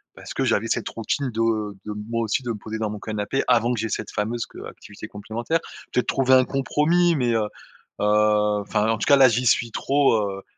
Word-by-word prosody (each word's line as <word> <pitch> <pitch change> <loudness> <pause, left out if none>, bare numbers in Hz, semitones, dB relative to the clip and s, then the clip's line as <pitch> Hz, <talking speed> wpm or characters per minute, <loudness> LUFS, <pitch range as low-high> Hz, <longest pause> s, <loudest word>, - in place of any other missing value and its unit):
parce - - -9
que - - -1
j'avais 110 +3 +1
cette - - -1
routine 125 +5 -2
de 110 -2 -1
de 105 - -5 0.2
moi 115 0 -1
aussi, 110 +4 0
de 120 - -5
me - - -3
poser 110 +1 -6
dans 110 -1 -1
mon 105 - -5
canapé 105 +5 -2
avant 120 -1 +3
que 120 - -3
j'ai 110 +1 -2
cette 105 0 -4
fameuse 115 +3 -2
q - - -15
heu, - - -7
activité - - -11
complémentaire, 110 +10 -3 0.3
peut-être 125 -1 0
trouver 130 -1 +2
un 130 -1 +5
compromis, 165 +6 +2
mais 125 -5 +1
heu 110 - +2 0.6
heu, 105 0 +2
enfin, 105 +1 -1
en 115 - +1
tout - - -2
cas, 140 - +6
là, 135 -1 +7
j'y 120 +2 0
suis 120 0 +3
trop, 140 +3 +2 0.2
heu, - - -11
115 Hz, 225 wpm, -23 LUFS, 105-130 Hz, 0.6 s, là